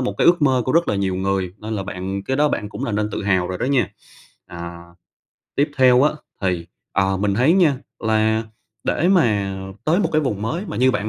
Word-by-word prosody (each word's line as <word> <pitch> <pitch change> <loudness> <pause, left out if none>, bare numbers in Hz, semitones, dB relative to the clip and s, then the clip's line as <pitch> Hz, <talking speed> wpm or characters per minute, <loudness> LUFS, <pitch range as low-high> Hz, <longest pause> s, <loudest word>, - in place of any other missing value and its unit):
một 125 - -1
cái - - +3
ước 175 -3 +5
mơ 130 -3 +3
của 130 - 0
rất 170 +1 +3
là - - +1
nhiều 95 -2 0
người 95 -1 -1
nên 110 +1 -5
là 100 - -2
bạn 95 0 -4
cái 135 - -1
đó 150 0 +3
bạn 105 -6 -2
cũng - - -5
nên 105 -1 -1
tự - - -3
hào 95 -2 +1
rồi 90 - -4
đó 120 - -1
nha. 135 -3 +2 0.6
À, 85 0 -8 0.8
tiếp 145 +2 +2
theo 130 0 +6
á 150 - +4 0.3
thì, 90 -3 -1 0.3
ờ, 95 0 +1
mình 100 0 0
thấy 130 +9 +4
nha 165 -8 +4 0.2
là 110 0 +1 0.4
để 175 - +1
mà 105 - +2 0.3
tới 165 +5 +3
một - - +1
cái 155 - +3
vùng 105 -8 -2
mới 165 - -2
mà - - -5
như 130 +2 +4
bạn 110 -3 -2
110 Hz, 225 wpm, -21 LUFS, 95-135 Hz, 0.8 s, theo